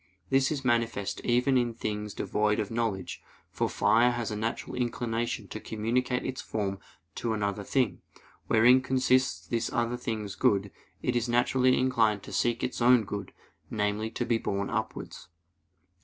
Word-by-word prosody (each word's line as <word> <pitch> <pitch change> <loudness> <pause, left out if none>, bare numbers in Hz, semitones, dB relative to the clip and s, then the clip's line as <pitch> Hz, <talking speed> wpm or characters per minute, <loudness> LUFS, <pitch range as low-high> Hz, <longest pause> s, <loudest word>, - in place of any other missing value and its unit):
This 135 +1 +3
is 140 -3 -3
manifest 115 -4 0
even 125 +2 +3
in 120 -2 -1
things 105 -1 -4
devoid 105 0 0
of 105 - -2
knowledge: 110 -6 -2 0.3
for - - -1
fire 120 +2 +4
has 120 -2 -2
a - - -2
natural 110 +2 -3
inclination 120 -1 -2
to - - -6
communicate 125 +3 -1
its 130 0 -3
form 100 -3 -3 0.3
to 115 -2 -2
another 100 -1 -2
thing, 125 +1 0 0.5
wherein 125 +3 +6
consists 130 0 +1
this 115 -1 -2
other 120 +1 0
thing's 110 -4 -4
good; 100 -1 +2
as 100 - -12 0.3
it 125 - 0
is 120 0 0
naturally 130 +1 +3
inclined 115 -6 +2
to - - -9
seek 120 -1 +1
its 125 - -3
own 120 -1 +6
good, 100 -1 -5 0.4
namely, 105 +1 -1
to 110 - -3
be 115 -1 +1
borne 100 -1 -2
upwards. - - -4
115 Hz, 160 wpm, -29 LUFS, 105-125 Hz, 0.5 s, wherein